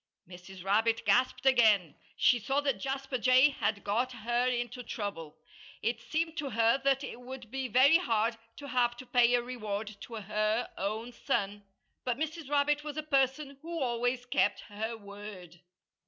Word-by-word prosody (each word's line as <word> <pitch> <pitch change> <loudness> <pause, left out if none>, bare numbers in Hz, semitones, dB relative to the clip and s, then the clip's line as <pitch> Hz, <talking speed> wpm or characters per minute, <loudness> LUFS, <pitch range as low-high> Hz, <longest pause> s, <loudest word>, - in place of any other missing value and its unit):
Mrs. 180 +1 -11
Rabbit 225 +4 +2
gasped 255 +2 +2
again. 220 - +4 0.2
She 245 - +4
saw 270 +6 0
that 280 -2 0
Jasper 270 -1 -3
Jay 255 +4 +6
had 220 -7 -2
got 235 +6 0
her 240 +2 0
into 245 0 -2
trouble. 200 -9 -6 0.5
It 230 0 -1
seemed 325 +5 -2
to 290 -2 -2
her 230 +1 +3
that 275 0 +2
it 245 - -7
would 250 -2 -9
be 265 0 -2
very 260 +7 +6
hard 230 -7 +1 0.2
to 285 - -8
have 240 -1 +1
to 255 - -9
pay 245 -1 +4
a 240 - +1
reward 215 -4 -5
to 235 - -8
her 215 +2 -1
own 220 +5 -3
son. 205 -3 -2 0.4
But 245 -2 -1
Mrs. 315 -1 -4
Rabbit 295 0 +2
was 300 0 -6
a 310 - -2
person 275 -1 0
who 335 +1 -5
always 245 -1 -1
kept 205 -4 +1
her 220 +3 -4
word. 200 -4 -10
240 Hz, 170 wpm, -31 LUFS, 215-270 Hz, 0.5 s, Jay